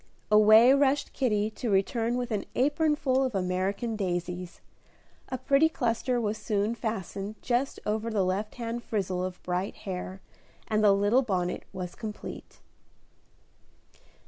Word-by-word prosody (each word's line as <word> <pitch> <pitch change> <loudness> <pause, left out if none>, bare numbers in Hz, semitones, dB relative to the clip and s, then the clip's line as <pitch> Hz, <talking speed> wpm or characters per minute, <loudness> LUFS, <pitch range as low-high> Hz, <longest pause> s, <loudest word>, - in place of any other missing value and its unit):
Away 215 +4 +7
rushed 280 0 +2
Kitty 215 -5 0
to 235 +2 -4
return 225 +4 +1
with 245 -1 -3
an 210 -2 -1
apron 295 +3 +2
full 265 -2 +1
of 255 -5 -2
American 195 +5 -1
daisies. 180 -2 -3 0.7
A 260 - -2
pretty 275 +5 +3
cluster 245 -2 0
was 215 -1 -2
soon 210 +1 0
fastened 210 -2 -4
just 255 +2 0
over 220 +2 -1
the 205 -4 +1
left 195 +3 -2
hand 235 0 -4
frizzle 190 -5 -2
of 185 -1 -6
bright 180 +2 -2
hair, 185 0 -5 0.5
and 215 -1 +1
the 205 - +7
little 205 +6 +3
bonnet 185 -7 -2
was 180 -1 -6
complete. 215 -2 -8
215 Hz, 140 wpm, -28 LUFS, 195-245 Hz, 0.7 s, Away